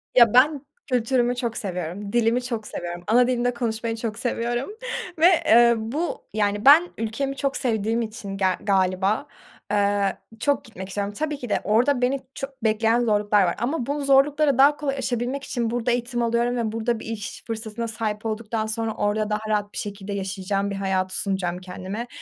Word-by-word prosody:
Ya, 235 -4 +7
ben 280 +3 +4 0.3
kültürümü 245 0 +2
çok 240 -2 -3
seviyorum. 185 +1 -4
Dilimi 240 +1 +2
çok 230 -3 -4
seviyorum. 175 0 -6
Ana 245 +3 +5
dilimde 245 -1 +1
konuşmayı 230 -1 -2
çok 225 -1 -4
seviyorum 240 +2 -2 0.5
ve 325 - +5 0.3
ııı 235 0 +6 0.2
bu, 330 +6 -3
yani 205 +1 0
ben 320 +6 +8
ülkemi 230 +5 -2
çok 275 0 -1
sevdiğim 225 -2 0
için 215 -3 -6
ger 190 -2 +1
galiba, 195 +5 +1 0.5
ııı, 200 -1 +2 0.3
çok 285 +3 +1
gitmek 190 -4 -8
istiyorum. 200 +1 -3
Tabii 300 +5 -2
ki 245 -4 -7
de - - +1
orada 245 +5 +2
beni 260 +2 +1 0.2
çok 270 -3 -7
bekleyen 225 +1 +2
zorluklar 210 -3 +3
var 175 - 0
ama 245 +3 -1
bu 290 +2 -2
zorlukları 280 +1 +4
daha 285 +2 +6
kolay 280 -2 -2
yaşayabilmek 255 +1 -2
için 235 -4 -2
burada 240 +1 0
eğitim 240 0 -1
alıyorum 235 +1 +1
ve 225 -2 -1
burada 225 +1 -1
bir - - -9
iş 220 -2 -6
fırsatına 225 0 -4
sahip 220 -1 -3
olduktan 220 0 -2
sonra 220 0 -2
orada 210 +1 0
daha 210 0 0
rahat 205 -1 -1
bir - - -8
şekilde 200 -1 -5
yaşayacağım 195 +1 -2
bir - - -3
hayatı 190 -1 -1
sunacağım 190 -3 -1
kendime. 185 +5 -6
225 Hz, 175 wpm, -24 LUFS, 205-245 Hz, 0.5 s, ben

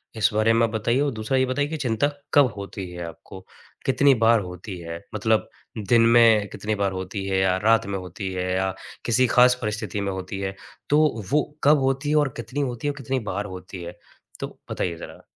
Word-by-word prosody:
इस 110 0 +3
बारे 110 +1 +3
में 115 0 +4
आप - - -2
बताइए 115 +4 +1
और 145 -1 +1
दूसरा 110 +5 -1
ये 130 - +3
बताइए 145 +3 0
कि 160 - -3
चिंता 125 +1 +1 0.3
कब 145 -2 +7
होती 100 -2 -6
है 85 0 -6
आपको? 85 +3 -10 0.5
कितनी 135 +1 +4
बार 115 0 +6
होती 90 +1 -7
है? 85 0 -6 0.2
मतलब - - +1 0.4
दिन 120 -1 +6
में 110 -3 +5
कितनी 105 0 -3
बार 100 -1 0
होती 95 +1 -5
है 95 -1 0
या 95 -1 +3
रात 115 0 +4
में 100 -1 -2
होती 95 +1 -6
है, 90 0 -2
या 95 0 0 0.3
किसी 125 +2 +3
ख़ास 125 +2 +5
परिस्थिति 105 -1 -3
में 100 -1 -1
होती 95 +1 -5
है, 95 0 -3 0.3
तो 150 -7 +3
वो 150 +1 +4 0.2
कब 145 +1 +6
होती 135 +2 0
है 155 - +2
और - - -2
कितनी 135 +4 -4
होती 125 +1 -3
है, - - +2
और - - -18
कितनी 130 +2 -1
बार 100 +2 -3
होती 90 -1 -8
है? 85 +1 -8 0.4
तो - - -6
बताइए 85 -2 -2
ज़रा। - - -10
110 Hz, 215 wpm, -24 LUFS, 95-130 Hz, 0.5 s, कब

